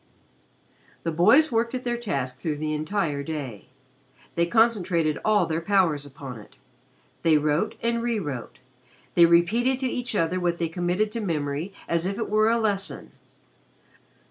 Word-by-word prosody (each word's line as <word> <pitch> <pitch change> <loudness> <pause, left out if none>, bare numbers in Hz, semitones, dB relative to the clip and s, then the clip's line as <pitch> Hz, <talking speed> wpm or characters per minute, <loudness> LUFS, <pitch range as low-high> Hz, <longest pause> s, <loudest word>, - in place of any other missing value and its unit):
The 165 - -1
boys 220 - +5
worked 230 +2 0
at 250 - -4
their 240 -1 -1
task 135 - -3
through 155 0 -2
the 155 +1 -3
entire 155 -1 -1
day. 140 - -6 0.7
They 170 0 +1
concentrated 185 -8 +2
all 215 -1 +3
their 160 +1 -2
powers 165 -6 +1
upon 135 -3 -9
it. 105 - -16 0.7
They 160 -2 +4
wrote 150 +8 0
and 235 0 0
re 235 -1 0
wrote 145 - -5 0.6
they 170 -1 +7
repeated 220 +10 +3
to 260 - +1
each 250 -1 -3
other 180 0 +1
what 175 -1 0
they 170 -1 -1
committed 180 +5 -1
to 230 - -4
memory 155 -1 -2 0.2
as 170 +1 0
if 195 +1 -3
it 225 - -3
were 215 +1 +4
a 230 - +3
lesson. 205 -3 -2
175 Hz, 160 wpm, -25 LUFS, 155-220 Hz, 0.7 s, they